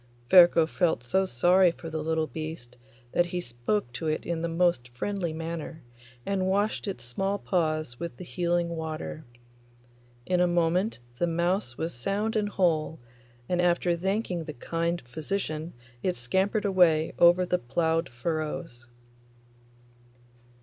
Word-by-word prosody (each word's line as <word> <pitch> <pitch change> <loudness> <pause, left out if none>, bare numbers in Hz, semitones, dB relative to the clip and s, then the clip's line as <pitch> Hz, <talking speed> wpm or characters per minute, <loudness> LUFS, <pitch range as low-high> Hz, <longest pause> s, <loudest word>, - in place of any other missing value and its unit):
Ferko 175 -3 +8
felt 160 -6 0
so 190 +11 +1
sorry 180 +6 +4
for 165 - -10
the 155 0 -2
little 160 0 0
beast 155 -6 -7 0.4
that 175 - +2
he 180 +1 -3
spoke 120 - -2
to 160 - -4
it 155 0 -1
in 165 -1 -2
the 170 - -1
most 165 -7 +1
friendly 175 +8 -3
manner, 160 0 -6 0.4
and 190 -2 0
washed 205 +3 0
its 195 - -4
small 195 +12 -1
paws 155 -10 -1
with 170 -8 -5
the - - -8
healing 175 -1 0
water. 160 -1 -5 1.0
In 180 -1 +1
a 180 - +4
moment 175 +4 +1 0.2
the 175 - +2
mouse 170 -6 0
was 165 +1 -3
sound 200 - -2
and 210 -1 +1
whole, 160 -5 +1 0.5
and 180 -1 +1
after 175 0 +2
thanking 185 -1 -2
the 155 - -6
kind 170 +5 -2
physician 155 +3 -4 0.3
it 180 -1 0
scampered 190 - 0
away 175 -5 +4
over 175 +1 +6
the 180 0 0
ploughed 160 +6 0
furrows. 150 -1 -4
170 Hz, 145 wpm, -28 LUFS, 155-180 Hz, 1.0 s, Ferko